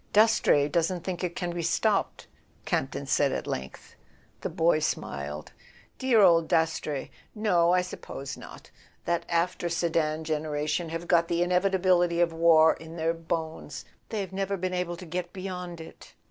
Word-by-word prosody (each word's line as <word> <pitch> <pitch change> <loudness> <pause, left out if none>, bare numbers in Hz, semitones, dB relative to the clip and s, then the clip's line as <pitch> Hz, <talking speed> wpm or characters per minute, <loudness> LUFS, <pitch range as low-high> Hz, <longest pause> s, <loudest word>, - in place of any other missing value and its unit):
"Dastrey 210 -9 +4
doesn't 170 +3 0
think 185 -1 -4
it 175 -1 -2
can 175 -1 -2
be 170 0 -3
stopped," 160 - 0 0.4
Camp - - 0
ton - - -5
said - - +2
at - - -3
length. 65 0 -6 0.5
The - - -2
boy 165 -1 +2
smiled. 75 - -4 0.5
"Dear 250 -4 +4
old 165 -4 +5
Dastrey! 160 -3 0 0.2
No, 180 -6 +3
I 180 0 +4
suppose 140 -6 -7
not. - - -12 0.3
That 170 0 -1
after 170 0 0
Sedan 160 -2 0
generation 155 +1 -2
have 165 +1 -5
got 170 -1 +4
the 170 0 +1
inevitability 180 -1 +2
of 170 -1 +2
war 165 -1 +6
in 160 +1 -11
their 165 0 0
bones. 165 -1 -5 0.2
They've 200 -4 -4
never 195 +1 -1
been 185 0 -2
able 180 -1 -2
to 180 - -9
get 175 +1 -4
beyond 180 -3 -6
it. 160 - -12
170 Hz, 160 wpm, -27 LUFS, 160-180 Hz, 0.5 s, war